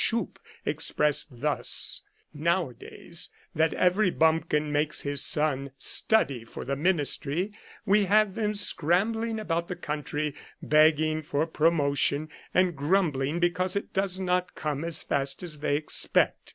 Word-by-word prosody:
Schupp, 230 0 -1 0.3
expressed 150 -4 0
thus: 150 0 +1 0.2
" - - -41
Nowa 170 -2 0
days - - -7 0.2
that 160 +1 +2
every 185 +2 +3
bumpkin 160 -2 +1
makes 150 +1 0
his 145 -1 -1
son 140 -3 +1
study 135 - +2
for 115 - -9
the 140 +2 -2
ministry, 165 +3 0 0.3
we 205 0 +3
have 210 +1 +3
them 210 -1 -1
scrambling 220 +5 +1
about 170 -5 -2
the 180 - -4
country 150 -1 -4 0.3
begging 155 +1 +3
for 150 0 -1
promotion, 155 -2 +1 0.2
and 180 -2 +2
grumbling 150 -2 0
because 180 +2 0
it 200 - -4
does 190 -1 0
not 180 -1 -1
come 150 -1 -3
as 170 -1 +2
fast 135 +3 -2
as 155 -4 -5
they 145 -1 0
expect. 150 - +1
160 Hz, 140 wpm, -27 LUFS, 145-185 Hz, 0.3 s, every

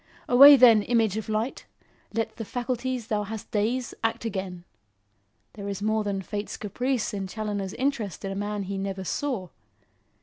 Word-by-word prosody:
Away, 280 +4 +10
then, 235 -5 +7
image 225 -2 +1
of 220 -1 -4
light! 220 +4 -2 0.4
Let 225 +1 -3
the 225 - -4
faculties 245 +1 -3
thou 215 -2 -1
hast 215 +1 -7
dazed, 235 +4 -1
act 225 0 -1
again. 190 -5 -4 0.9
There 200 -2 -6
is 200 0 -4
more 215 0 +1
than 195 -2 -2
Fate's 205 +3 -5
caprice 245 +4 -2
in 195 -1 -3
Challoner's 205 -2 -4
interest 245 -9 -2
in 195 - -3
a - - -4
man 205 0 -3
he 195 +1 -4
never 195 -1 -4
saw. 215 -3 -3
215 Hz, 165 wpm, -26 LUFS, 200-240 Hz, 0.9 s, Away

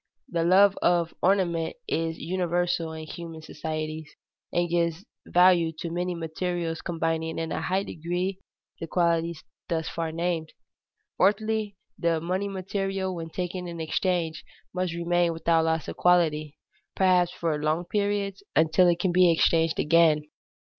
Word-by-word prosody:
The 170 -2 0
love 195 +3 +5
of 170 -1 +2
ornament 175 -4 +1
is 165 0 -1
universal 175 -1 -1
in 160 0 -7
human 165 0 -8
societies, 155 0 -5 0.4
and 175 0 +1
gives 170 +2 0 0.2
value 180 -2 +5
to 165 +1 -6
many 180 +1 -2
materials 165 0 -3
combining 165 -1 -2
in 165 0 -3
a - - -2
high 185 +4 0
degree 180 +3 -3 0.4
the 165 - -5
qualities 170 -1 0 0.3
thus 160 -1 -1
far 165 -1 -3
named. 165 -1 -2 0.6
Fourthly, 210 +1 +1 0.2
the 170 -2 +1
money 185 +5 -2
material, 195 0 -2
when 165 -2 -6
taken 180 +1 -4
in 170 -1 -7
exchange, 165 -1 -1 0.3
must 180 -2 -2
remain 170 0 +1
without 165 0 +2
loss 160 -1 0
of - - -6
quality, 155 -4 +2 0.4
perhaps 180 -2 +4
for 165 -4 -2
long 155 +3 0
periods, 200 -1 -1
until 160 +4 +4
it 170 -1 +2
can 180 0 +1
be 180 -1 +5
exchanged 165 0 +2
again. 155 -1 +4
170 Hz, 140 wpm, -26 LUFS, 160-180 Hz, 0.6 s, love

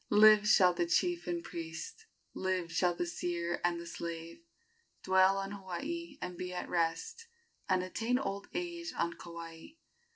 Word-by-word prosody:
Live 210 0 +7
shall 185 -4 +6
the 175 0 0
chief 345 - +1
and 340 -1 -2
priest, 160 - -7 0.3
Live 185 -3 -1
shall 175 +1 +2
the 175 - -1
seer 175 0 -2
and 175 -1 +1
the 170 - -7
slave, 170 - -6 0.6
Dwell 190 +1 +5
on 195 0 -3
Hawaii 285 - -5
and 180 - -4
be 180 +1 -5
at - - -3
rest, 165 - -1 0.4
And 185 -1 +3
attain 225 +6 0
old 200 -6 -3
age 345 -1 -3
on 170 0 0
Kauai. 170 - -9
185 Hz, 155 wpm, -33 LUFS, 170-215 Hz, 0.6 s, Live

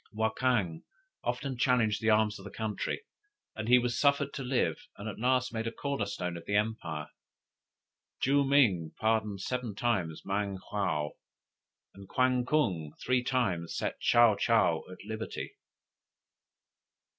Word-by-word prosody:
Wakang 110 -5 0 0.4
often 135 -4 -2
challenged 120 -5 +2
the 110 - +2
arms 110 -1 +3
of 95 - -12
his 100 - -11
country, 110 - -3 0.5
and 110 +1 -4
was 120 -1 -1
suffered 140 -1 +3
to 140 - -4
live, 130 -1 +1 0.2
and 100 - -6
at 105 - -6
last 125 +1 +1
made 115 0 -2
a - - -2
corner 140 -4 -2
stone 90 -3 -3
of 85 - -10
the 100 - 0
empire. 105 -8 -1 1.1
Joo 140 +1 +3
ming 115 - +3
pardoned 110 -3 +1
seven 125 -2 -3
times 95 -9 -1
Mang 100 0 -1
hwo; 80 -8 0 0.8
and 100 -1 -13
Kwan 125 -1 +2
kung 95 - +1
three 125 -1 +1
times 100 -11 -1
set - - -3
Tsaou 120 -3 +5
tsaou 95 -8 +2
at 95 +1 -11
liberty. 110 +1 -5
110 Hz, 140 wpm, -30 LUFS, 100-125 Hz, 1.1 s, Tsaou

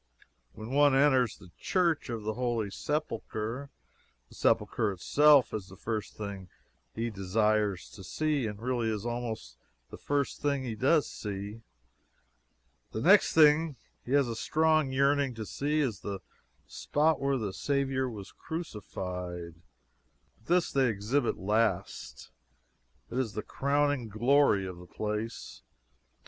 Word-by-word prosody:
When 110 +3 -8
one 145 0 +5
enters 130 -4 +3
the 90 - -16
Church 170 -8 +1
of 115 -3 -4
the 110 +1 -2
Holy 120 -4 -1
Sepulchre, 130 -3 -3 0.6
the - - -16
Sepulchre 110 -2 +1
itself 145 - +4
is 100 -3 -4
the 95 -1 -13
first 110 0 -4
thing 100 -3 -6 0.5
he 115 +1 -2
desires 105 0 0
to 95 - -11
see, 150 +3 -1
and 105 -1 -6
really 120 -1 -1
is 105 0 -3
almost 120 -2 -4 0.3
the - - -9
first 145 -1 -1
thing 140 -2 0
he 120 -3 -3
does 140 +7 +3
see. 105 +1 -6 1.3
The 110 - -3
next 195 - +5
thing 155 -1 +5 0.3
he 125 - -4
has 140 -2 +4
a 115 - -3
strong 155 +2 +2
yearning 140 -1 +2
to 110 -1 -5
see 150 +7 -1
is 120 -9 -1
the 100 -1 -4 0.5
spot 155 +2 +1
where 140 0 +1
the 105 -5 -3
Saviour 135 -1 0
was 105 -5 -9
crucified. 90 - -6 0.9
But 110 - -28
this 175 0 +2
they 135 -2 +3
exhibit 115 +6 0
last. 95 - -1 0.8
It 125 - -1
is 115 -5 -1
the 105 - -4
crowning 140 -3 0
glory 120 -2 +3
of 90 -2 -7
the 90 - -12
place. 105 +3 -5
120 Hz, 140 wpm, -30 LUFS, 105-140 Hz, 1.3 s, one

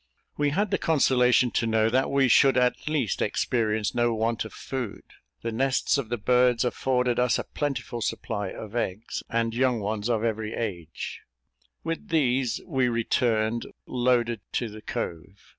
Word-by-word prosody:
We 145 0 +1
had 200 +7 0
the - - +1
consolation 125 -5 +3
to 115 - 0
know 110 -1 +3
that 130 +2 +2
we 135 -1 +3
should 135 +2 +5
at 125 +3 +1
least 145 -9 0
experience 110 -4 0
no 120 -1 +1
want 115 +1 0
of 110 - -8
food 125 -6 -5 0.4
the 115 - -2
nests 130 +4 +1
of 120 -5 -4
the 120 - -1
birds 125 +2 +3
affording 125 -1 0
us 125 -1 +3
a - - -2
plentiful 140 -4 -3
supply 105 0 -2
of 110 +3 -8
eggs, 110 -1 -3
and 115 -1 0
young 125 -1 +2
ones 105 +2 -2
of 115 -2 +1
every 110 -1 -2
age; 85 -8 -5 0.6
with 165 +6 -4
these 130 -6 +1
we 130 -7 +1
returned 115 -1 0 0.2
loaded 120 -3 +1
to 120 - -1
the 105 +1 -10
cove. 95 +1 -6
120 Hz, 160 wpm, -26 LUFS, 110-130 Hz, 0.6 s, should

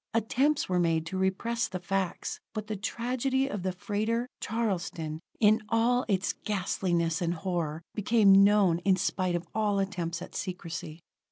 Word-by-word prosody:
Attempts 270 +6 +2
were 180 -1 +1
made 165 -2 +1
to 165 - -5
repress 230 +6 0
the 185 - -4
facts: 190 0 -2 0.2
but 215 -1 -3
the 215 0 -4
tragedy 255 +6 -1
of 205 -8 -4
the 185 +1 -1
freighter, 215 +5 -1
Charleston, 180 -8 -2 0.2
in 215 +1 +5
all 240 +2 +2
its 195 -2 +1
ghastliness 175 -4 0
and 170 0 0
horror, 165 -2 -3
became 200 -2 +5
known 200 -4 +4
in 190 +1 +3
spite 185 -1 0
of 170 0 -3
all 210 -2 +1
attempts 175 -4 -2
at - - -11
secrecy. 165 -3 -5
195 Hz, 155 wpm, -29 LUFS, 175-220 Hz, 0.2 s, in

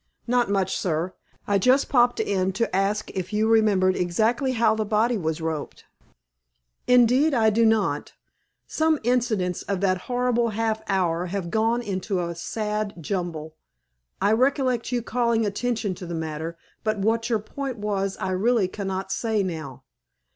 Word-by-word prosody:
"Not 245 -2 +1
much, 195 -2 0
sir. 170 +1 -1 0.3
I 200 -1 +2
just 255 +7 +3
popped 245 -3 +3
in 190 -1 0
to 210 -1 -1
ask 200 +2 0
if 185 0 -4
you 215 +1 +1
remembered 205 -4 +3
exactly 225 +9 +1
how 230 -2 +3
the 220 0 -1
body 220 +3 +1
was 160 -4 -2
roped?" 160 -2 -4 1.0
"Indeed, 250 +4 +4
I 220 -2 +4
do 225 +2 +3
not. 205 -10 0 0.5
Some 315 -1 +1
incidents 220 -7 0
of 200 -2 -3
that 185 -2 +2
horrible 245 -1 +1
half 220 -1 0
hour 180 -2 +1
have 180 -2 -4
gone 225 +3 +1
into 190 -2 -2
a 170 -1 -2
sad 210 +4 -3
jumble. 165 -2 -4 0.7
I 205 - +2
recollect 255 0 +1
you 240 -2 -1
calling 235 -2 +1
attention 220 0 -1
to 180 0 -9
the 170 - -4
matter, 160 +1 -4 0.3
but 215 -1 0
what 225 +4 0
your 230 - +2
point 265 +4 -5
was 195 -2 -2
I 190 - -3
really 210 +2 +2
cannot 190 0 -4
say 220 -1 0
now. 155 -8 -6
210 Hz, 155 wpm, -24 LUFS, 185-235 Hz, 1.0 s, Indeed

